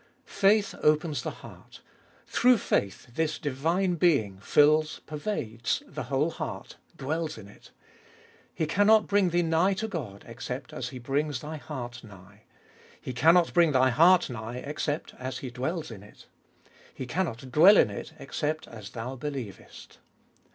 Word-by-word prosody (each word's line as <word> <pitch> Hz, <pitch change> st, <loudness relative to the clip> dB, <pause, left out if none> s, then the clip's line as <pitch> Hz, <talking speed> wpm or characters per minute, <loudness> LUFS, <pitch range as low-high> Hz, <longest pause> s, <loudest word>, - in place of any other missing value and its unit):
3. -, -, -17 dB, 0.3 s
Faith -, -, -9 dB
opens 150 Hz, -3 st, +2 dB
the -, -, -3 dB, 0.2 s
heart— -, -, -14 dB, 0.5 s
through 250 Hz, 0 st, +4 dB
faith 100 Hz, -, -1 dB
this 155 Hz, +2 st, -1 dB
divine 165 Hz, +7 st, 0 dB
Being 140 Hz, -, +2 dB
fills, 155 Hz, +8 st, +3 dB
pervades, 145 Hz, -, -3 dB
the -, -, -7 dB
whole 140 Hz, +5 st, 0 dB
heart, -, -, -7 dB, 0.2 s
dwells 155 Hz, +2 st, -3 dB
in 105 Hz, -2 st, -11 dB
it. 105 Hz, -, -17 dB, 0.9 s
He 160 Hz, -, 0 dB
cannot 205 Hz, +6 st, +4 dB
bring 200 Hz, -2 st, +2 dB
thee 175 Hz, +1 st, +1 dB
nigh 165 Hz, +4 st, +2 dB
to 220 Hz, +3 st, -3 dB
God 130 Hz, -, -6 dB
except 125 Hz, +3 st, -7 dB
as 125 Hz, -1 st, -4 dB
He 130 Hz, -, -8 dB
brings 140 Hz, +2 st, -2 dB
thy 155 Hz, +1 st, -6 dB
heart 120 Hz, -6 st, -7 dB
nigh. 100 Hz, 0 st, -16 dB, 0.5 s
He 130 Hz, -, -6 dB
cannot 165 Hz, +7 st, +4 dB
bring 170 Hz, -4 st, +4 dB
thy 130 Hz, 0 st, +4 dB
heart 175 Hz, +7 st, +5 dB
nigh 120 Hz, -1 st, -6 dB
except 150 Hz, +1 st, -3 dB
as 130 Hz, +1 st, -4 dB
He 130 Hz, -, -7 dB
dwells 155 Hz, +5 st, -3 dB
in 105 Hz, -4 st, -9 dB
it. 105 Hz, -, -16 dB, 0.7 s
He 130 Hz, -, -7 dB
cannot 130 Hz, -4 st, -3 dB
dwell 180 Hz, +9 st, +7 dB
in 105 Hz, -, +4 dB
it 100 Hz, -, -7 dB
except 150 Hz, +3 st, -3 dB
as 110 Hz, -3 st, -10 dB
thou 120 Hz, +4 st, -6 dB
believeat. 130 Hz, -7 st, -8 dB
145 Hz, 155 wpm, -28 LUFS, 120-165 Hz, 0.9 s, dwell